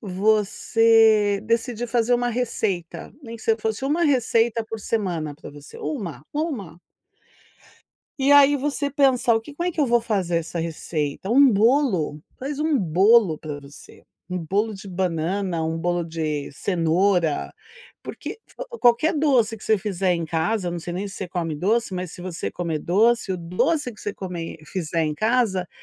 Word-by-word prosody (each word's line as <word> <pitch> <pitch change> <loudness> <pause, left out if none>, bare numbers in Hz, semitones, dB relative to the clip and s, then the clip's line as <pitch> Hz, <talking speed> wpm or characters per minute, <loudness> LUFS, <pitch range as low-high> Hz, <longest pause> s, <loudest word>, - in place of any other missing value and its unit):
você 215 +1 +3
decidir 230 +1 -1
fazer 240 +1 +2
uma 245 0 0
receita, 220 -7 -3
nem 230 -3 -8
que 220 - -14
você 225 -1 +2
fosse 220 +3 -3
1 310 +5 +1
receita 230 -4 +2
por 225 0 -6
semana 175 -9 -2
pra 150 - -11
você. 145 0 -12
1, 195 - -5
1. 245 - -4 1.4
E 275 +1 +2
aí 285 0 +7
você 285 +1 -1
pensa: 260 -4 +3
"O 225 - +1
que 290 +6 -12
como 345 +3 -1
é - - -2
que 315 - -3
eu 290 - +3
vou 240 -1 +3
fazer 195 -7 -1
essa 165 0 -3
receita?". 160 +1 -3
Um 275 +2 +6
bolo, 205 - +2 0.2
faz 285 +2 -4
um 310 -2 +2
bolo 190 +1 +4
pra 150 -1 -7
você. 140 +1 -15 0.3
Um 180 - -2
bolo 200 +7 -1
de 200 0 -10
banana, 180 0 -1
um 160 0 -2
bolo 175 +1 -1
de 155 -3 -3
cenoura, 170 0 +1 0.5
porque - - -7 0.4
qualquer 245 +8 +4
doce 245 -7 +2
que - - -16
você 220 - +3
fizer 195 -3 -1
em 170 -1 -2
casa, 175 +4 -1
não 175 - -4
sei 175 +1 -6
nem 195 +3 -3
se 195 - -10
você 190 - -5
come 170 -3 -3
doce, 215 +6 0
mas 180 -2 -4
se 175 - -10
você 180 -2 -4
comer 170 -3 -2
doce, 215 +5 +2
o - - -2
doce 180 - -1
que 215 - -16
você 205 - -4
comer 175 -4 -6
fizer 165 -2 -2
em 155 -1 -1
casa 215 -3 +1
200 Hz, 170 wpm, -23 LUFS, 170-235 Hz, 1.4 s, aí